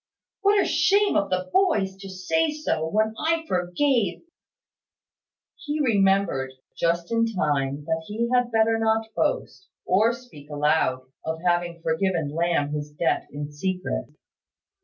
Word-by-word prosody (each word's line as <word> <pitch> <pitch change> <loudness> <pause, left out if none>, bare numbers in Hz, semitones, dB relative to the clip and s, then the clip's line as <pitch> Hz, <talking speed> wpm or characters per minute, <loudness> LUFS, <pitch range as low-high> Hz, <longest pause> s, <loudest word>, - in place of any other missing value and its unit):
What 405 +1 +4
a - - +3
shame 405 +1 +3
of 200 - +1
the 185 0 -2
boys 215 - +2
to 195 0 -9
say 250 - 0
so, 230 - -2
when 215 +3 +1
I 325 0 0
forgave 190 - 0 0.7
" - - -28
He 300 0 -2
remembered, 195 - +2 0.2
just 170 +2 0
in 230 0 +2
time, 145 -8 -1
that 160 0 -2
he 225 +3 -1
had 245 -1 +2
better 225 0 +3
not 220 0 0
boast, - - -1 0.2
or 215 +5 +4
speak 235 - -12
aloud, 150 -3 +1 0.2
of 160 0 -4
having 175 -1 0
forgiven 165 -1 0
Lamb 165 -3 +1
his 150 0 -3
debt 150 +3 -1
in 145 +1 -6
secret. 185 +5 -3
190 Hz, 140 wpm, -25 LUFS, 160-230 Hz, 0.7 s, What